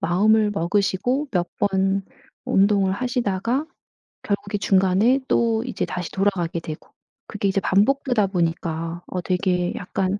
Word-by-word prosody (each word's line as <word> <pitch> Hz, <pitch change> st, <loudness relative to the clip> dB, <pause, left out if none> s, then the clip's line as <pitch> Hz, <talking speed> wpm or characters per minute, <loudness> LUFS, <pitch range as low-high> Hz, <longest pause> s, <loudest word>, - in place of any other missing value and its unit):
마음을 210 Hz, +4 st, +3 dB
먹으시고 200 Hz, -, 0 dB
몇 175 Hz, -2 st, 0 dB
번 195 Hz, 0 st, +1 dB, 0.4 s
운동을 195 Hz, -1 st, +3 dB
하시다가 240 Hz, +3 st, -1 dB, 0.6 s
결국에 205 Hz, 0 st, -2 dB
중간에 195 Hz, +7 st, +3 dB
또 230 Hz, -1 st, +2 dB
이제 250 Hz, -1 st, -3 dB
다시 180 Hz, -2 st, -5 dB
돌아가게 190 Hz, -4 st, 0 dB
되고. 155 Hz, -1 st, -8 dB, 0.4 s
그게 205 Hz, -1 st, -2 dB
이제 195 Hz, 0 st, +1 dB
반복되다 220 Hz, +2 st, +2 dB
보니까 165 Hz, -2 st, -2 dB
어. 180 Hz, -, -3 dB
되게 180 Hz, -1 st, 0 dB
약간 190 Hz, +2 st, -2 dB
195 Hz, 290 characters per minute, -23 LUFS, 180-215 Hz, 0.6 s, 마음을